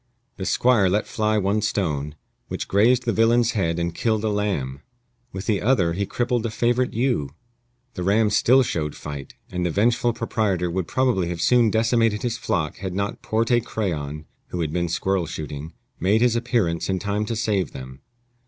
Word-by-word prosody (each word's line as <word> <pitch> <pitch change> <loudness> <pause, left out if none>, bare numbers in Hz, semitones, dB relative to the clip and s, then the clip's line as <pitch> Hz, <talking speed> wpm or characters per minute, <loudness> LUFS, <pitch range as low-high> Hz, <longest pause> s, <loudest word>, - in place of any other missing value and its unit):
The 95 - -4
squire 115 -7 +3
let 105 +3 +1
fly 110 0 0
one 105 +1 +1
stone, 75 -9 -1 0.3
which - - -4
grazed 120 +5 +3
the 115 - +1
villain's 115 +2 +3
head 85 -7 0
and 85 0 -1
killed 110 +3 0
a 110 - +1
lamb. 75 -11 -2 0.5
With 95 +1 -6
the 105 -2 +1
other 100 -9 +2
he 100 +3 -2
crippled 120 -1 -1
a - - -4
favorite 120 +3 +1
ewe. 115 - -1 0.6
The 90 - -5
ram 105 +3 +2
still 130 +5 +5
showed 75 -10 -2
fight, 70 -2 -8 0.2
and 90 0 -2
the 90 - +1
vengeful 115 +6 +2
proprietor 105 -6 -1
would 90 -1 -2
probably 125 -9 +1
have 85 -1 -4
soon 120 +4 +4
decimated 115 -1 +2
his 120 -2 -1
flock 80 -9 -1
had 95 -2 -5
not 100 +1 -2
Porte 115 +2 +1
Crayon 75 -10 -3 0.2
(who 90 - -4
had 80 -2 -2
been 85 -1 0
squirrel 95 +1 0
shooting) 75 +1 -6 0.3
made 100 +6 +2
his 120 -1 +3
appearance 115 -10 0
in 95 - +1
time 100 +3 -1
to 115 - -2
save 100 - 0
them. 65 +1 -9
100 Hz, 180 wpm, -23 LUFS, 85-115 Hz, 0.6 s, still